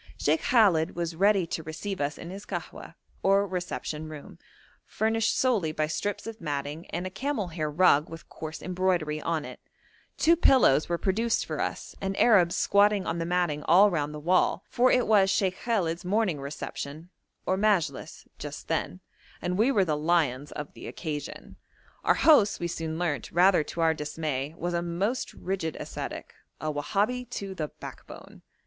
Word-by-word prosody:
Sheikh 155 +2 +1
Khallet 190 -9 +3
was 170 -1 -3
ready 195 +1 +3
to 165 - -4
receive 165 +4 -5
us 145 0 -1
in 170 - -8
his 195 +2 -8
kahwa - - -7 0.3
or 195 +1 +3
reception 175 -4 -4
room, 150 -2 -10 0.4
furnished 225 +1 0
solely 220 -12 +2
by 155 0 0
strips 195 +6 -3
of 225 -1 -8
matting 145 +1 -4
and 175 +2 -4
a 185 - -4
camel 220 -2 -2
hair 155 -2 -3
rug 150 -1 +4
with 165 0 -10
coarse 155 0 -8
embroidery 180 -4 0
on 160 -2 -1
it; - - -9 0.6
two 335 +1 +5
pillows 255 - +4
were 170 - +1
produced 225 +6 0
for - - -3
us, - - -4
and 195 0 -2
Arabs 185 -7 +5
squatted 200 -1 +3
on 165 +1 -2
the 165 - -2
matting 175 -4 0
all 195 +5 +6
round 150 -3 -1
the 150 - -7
wall, 180 +3 +2
for 250 +1 +4
it 250 - +3
was 200 -3 +4
Sheikh 190 -1 +1
Khallet's 180 -7 0
morning 190 -4 0
reception, 145 +3 -6 0.3
or 185 - +1
majilis, 200 -4 0
just - - -7
then, 90 +1 -2 0.4
and 180 +1 -2
we 225 +7 +3
were 200 -7 +3
the 155 -3 0
lions 150 -4 0
of 150 -1 -7
the - - -10
occasion. 150 -4 -6 0.5
Our - - +4
host, 220 -10 +5
we 175 - -2
soon 160 -1 -4
learnt, 160 -7 -2
rather 180 -1 +4
to 170 - -5
our 165 -1 +4
dismay, 150 -1 -4
was 175 0 -3
a 170 - 0
most 190 +8 -2
rigid 180 -4 -3
ascetic - - -6 0.3
a 155 -1 -2
Wahabi 215 +11 -1
to 195 -4 -5
the 155 -5 -3
backbone. - - -12
175 Hz, 175 wpm, -27 LUFS, 155-200 Hz, 0.6 s, all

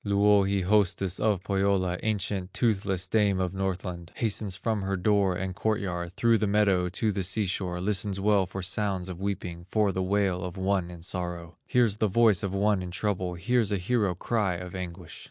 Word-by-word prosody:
Louhi, 100 -1 +3
hostess 95 -1 +2
of 105 -4 +1
Pohyola, 95 -2 +1
Ancient, 100 -3 -2
toothless 95 -5 0
dame 100 -1 +2
of 90 -1 -1
Northland, 90 -3 -4
Hastens 105 -4 -1
from 110 +1 -1
her 95 0 -1
door 100 0 +2
and 95 +1 -3
court 110 +1 0
yard, 90 -2 -4
Through 115 +2 +3
the 105 - +1
meadow 100 -3 +2
to 105 +4 0
the 100 - -2
sea 100 +4 0
shore, 90 -1 -2
Listens 100 +1 -1
well 100 -2 +3
for 95 +2 -6
sounds 95 -1 -1
of 90 0 -7
weeping, 90 -3 -4
For 105 -2 +2
the 95 - -2
wail 95 -1 0
of 90 0 -6
one 95 -2 0
in 85 -2 -10
sorrow; 85 -2 -4
Hears 115 -5 +2
the 110 - +2
voice 110 -1 +4
of 100 - -2
one 100 0 +1
in 90 - -5
trouble, 90 -1 -2
Hears 115 +4 +1
a 100 - +1
hero 100 -1 0
cry 100 -1 0
of 90 0 -7
anguish. 90 -2 -7
95 Hz, 190 wpm, -27 LUFS, 90-105 Hz, -, voice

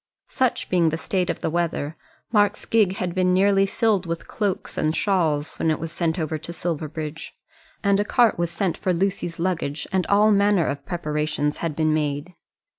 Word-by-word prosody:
Such 255 -2 0
being 175 -3 +3
the 160 - -2
state 180 +2 -1
of 170 - -2
the - - 0
weather 165 -2 -1 0.4
Mark's 205 -2 +2
gig 210 -4 +2
had 180 -3 -2
been 185 0 +2
nearly 195 +1 +4
filled 200 -3 +1
with 165 0 -4
cloaks 205 -4 -2
and 155 +1 0
shawls 160 -7 +1
when 160 - +1
it 155 - +1
was 165 0 -5
sent 170 0 -1
over 155 -2 -2
to 160 +2 -7
Silverbridge. 155 -2 -4 0.5
And 200 -1 +3
a - - +3
cart 235 +2 +3
was 170 -1 0
sent 170 +1 -2
for 185 - 0
Lucy's 180 -2 -1
luggage, 165 -4 -2
and 190 -1 0
all 210 +2 +5
manner 200 -4 +3
of 140 0 -4
preparations 150 -3 -1
had 165 -3 -3
been 155 0 +2
made. 150 +2 -2
170 Hz, 190 wpm, -23 LUFS, 155-195 Hz, 0.5 s, all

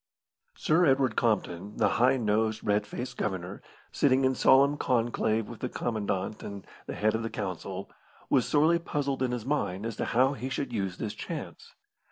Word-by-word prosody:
Sir 160 +3 +2
Edward 135 -3 +3
Compton, 105 -4 -1
the - - +3
high 130 +2 +4
nosed, 110 -1 0
red 105 0 +1
faced 125 0 -6
Governor, 95 -2 -3 0.3
sitting 135 -1 +3
in 130 - +3
solemn 140 +2 +5
conclave 115 -4 0
with 120 - -9
the 125 - -3
commandant 105 -4 -2
and 100 -1 -7 0.2
the - - -4
head 110 +1 +1
of 110 - -1
the 115 - -3
council, 95 -6 -5 0.4
was 130 -4 +2
sorely 160 +3 +4
puzzled 140 -5 -2
in 130 - +1
his 120 -3 -3
mind 110 -9 -1
as 115 -2 -3
to - - -1
how 130 +4 +3
he 130 0 -5
should 130 -1 -3
use 95 -4 -2
this 105 - -4
chance. - - -7
115 Hz, 180 wpm, -29 LUFS, 105-130 Hz, 0.4 s, solemn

